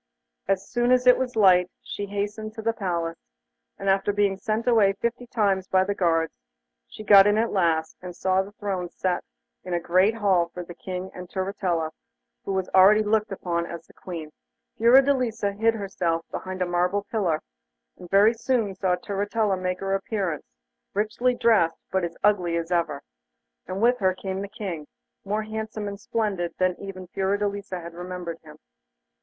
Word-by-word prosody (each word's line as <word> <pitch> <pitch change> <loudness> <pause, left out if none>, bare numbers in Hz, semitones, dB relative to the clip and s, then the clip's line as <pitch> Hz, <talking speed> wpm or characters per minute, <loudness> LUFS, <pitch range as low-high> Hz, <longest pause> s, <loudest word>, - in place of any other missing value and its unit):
As 195 0 0
soon 240 0 +1
as 250 0 +4
it 250 - +8
was 250 -2 -3
light 185 -4 +5
she 215 -4 -5
hastened 210 +2 -4
to 220 - -6
the 230 +1 +1
palace, 170 -6 -2 0.6
and 195 - -6
after 195 +1 +3
being 200 -1 +1
sent 215 +3 -2
away 215 -5 +5
fifty 235 +4 -3
times 200 -5 +1
by 185 -1 +3
the 200 +2 -1
guards, 165 -4 +1 0.5
she 215 - -10
got 200 -1 +8
in 205 +1 +3
at 230 +1 +1
last, 165 -4 +1
and 180 -1 -8
saw 190 +1 +2
the 195 +1 -8
thrones 190 -4 -4
set 185 -1 -1 0.4
in 180 - -5
the 175 - +1
great 185 +6 +3
hall 190 -6 +2
for 180 - -4
the 175 - -10
King 185 +2 -6
and 180 -1 -9
Turritella, 185 -4 -1 0.5
who - - -4
was 190 -1 -1
already 200 +3 +6
looked 215 0 +1
upon 170 -3 -2
as 170 -1 -8
Queen. 165 -4 -7 0.4
Fiordelisa 245 -3 +4
hid 225 +3 +1
herself 180 -5 -2
behind 185 0 -3
a - - 0
marble 180 +3 0
pillar, 180 -9 +1 0.6
and 180 -1 -12
very 205 +4 +5
soon 230 -3 0
saw 185 -1 +1
Turritella 205 +2 -1
make 185 0 -3
her 195 0 -1
appearance, 195 -5 -2 0.5
richly 225 +4 +1
dressed, 215 -9 +3
but 190 -1 +1
as 170 -1 -4
ugly 180 -5 +2
as 165 +1 -4
ever, 165 -5 0 0.6
and 190 +4 -3
with 245 +1 +4
her 185 -2 +2
came 190 0 -4
the 200 - -4
King, 190 -7 -6 0.4
more 210 +2 -1
handsome 220 -1 -5
and 200 0 -6
splendid 200 -6 -2
even 185 +1 -2
than - - -13
Fiordelisa 200 0 -2
had 170 0 -9
remembered 175 -1 -6
him. 150 -1 -13
195 Hz, 175 wpm, -25 LUFS, 180-215 Hz, 0.6 s, it